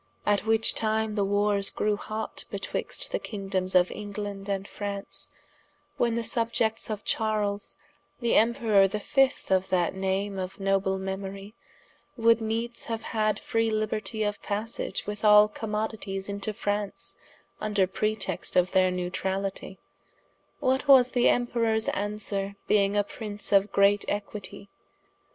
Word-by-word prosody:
at 205 +1 +1
which 225 0 +4
time 220 0 0
the 205 -1 +1
warres 205 0 +1
grew 210 0 0
hotte 215 +1 -5
betwixt - - -4
the - - 0
kingdomes 195 -3 -3
of 180 - 0
England 205 -1 -6
and 195 0 -2
Fraunce, 200 -1 -3 0.7
when 235 -1 +1
the 235 - -1
subiects 230 -1 0
of 210 -2 -4
Charles 210 -2 -1 0.4
the 235 -2 +1
Emperour 225 -4 +4
the 210 +2 -3
fift 270 +3 +1
of 190 0 +2
that 180 -2 +1
name 190 +1 -1
of 185 +1 -5
noble 195 0 +1
memorie, 195 +1 -5 0.6
would 230 0 +4
needes 230 +2 -2
haue 230 - -2
had 215 -1 -1
free 225 0 0
libertie 215 0 -1
of 205 0 -2
passage 215 +3 -3
with 210 +1 -5
all 210 0 +8
commodities 210 -2 -4
into 200 +1 -3
Fraunce, 205 0 -2 0.5
vnder 210 -3 +2
pretext 215 -4 -1
of 180 0 +3
their 185 -1 +4
Newtralitie, 190 +2 -3 0.8
What 265 +2 +1
was 260 -3 +7
the 245 - +4
Emperours 230 -2 +1
answere 200 -1 -3
being 200 -1 +3
a 205 - +4
Prince 205 0 -5
of 200 0 +4
great 200 +1 +4
equitie? 205 -1 -4
205 Hz, 135 wpm, -27 LUFS, 195-220 Hz, 0.8 s, all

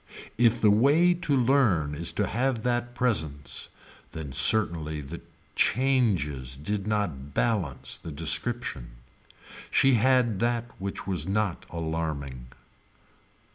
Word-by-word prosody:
If 120 0 +3
the 105 - +5
way 145 +11 +4
to 170 -5 -1
learn 115 - +2
is 80 +3 -1
to 105 - 0
have 120 +2 -1
that 120 0 -1
presence 80 - -1 0.4
then 80 -4 -6
certainly 80 -4 +2
the 70 -2 -8 0.3
changes 95 - +1
did 100 +7 -3
not 85 -11 -2
balance 100 - -1
the 80 - -9
description. 80 - -1 0.8
She 135 0 +4
had 120 -3 +3
that 120 0 -1
which 100 0 -5
was 90 -5 -3
not 100 -2 -1
alarming. 80 -6 -4
100 Hz, 115 wpm, -27 LUFS, 75-120 Hz, 0.8 s, the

